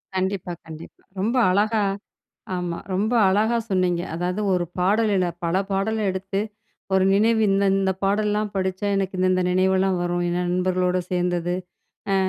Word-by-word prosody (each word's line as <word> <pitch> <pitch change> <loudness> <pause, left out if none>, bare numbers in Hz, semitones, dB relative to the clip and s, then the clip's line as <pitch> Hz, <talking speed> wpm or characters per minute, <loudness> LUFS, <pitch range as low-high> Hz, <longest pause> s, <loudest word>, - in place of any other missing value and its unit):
கண்டிப்பா, 185 -1 -2
கண்டிப்பா. 160 0 -11 0.2
ரொம்ப 230 +5 0 0.2
அழகா 210 +2 +2 0.7
ஆமா, 175 -2 -3 0.2
ரொம்ப 215 +5 0 0.2
அழகா 220 +4 +2
சொன்னீங்க. 180 -2 +1
அதாவது 180 +4 -2
ஒரு 175 -1 +1
பாடல் 210 +4 +2
இல்ல 180 -1 +2 0.2
பல 170 +2 0 0.2
பாடல 215 +2 0
எடுத்து 195 +1 -3 0.5
ஒரு 190 0 +4
நினைவு 220 +2 +3
இந்த 200 +1 +2
இந்த 190 -1 +1
பாடல்லலாம் 210 +1 +1
படிச்சா, 190 +1 -1
எனக்கு 190 -1 -2
இந்த 185 0 +2
இந்த 185 0 +1
நினைவெல்லாம் 190 0 +2
வரும். 175 0 -1
என் 175 - -1
நண்பர்களோட 185 0 +1
சேர்ந்தது 175 -1 0 0.6
ஆ - - +3
190 Hz, 145 wpm, -23 LUFS, 180-205 Hz, 0.7 s, ஒரு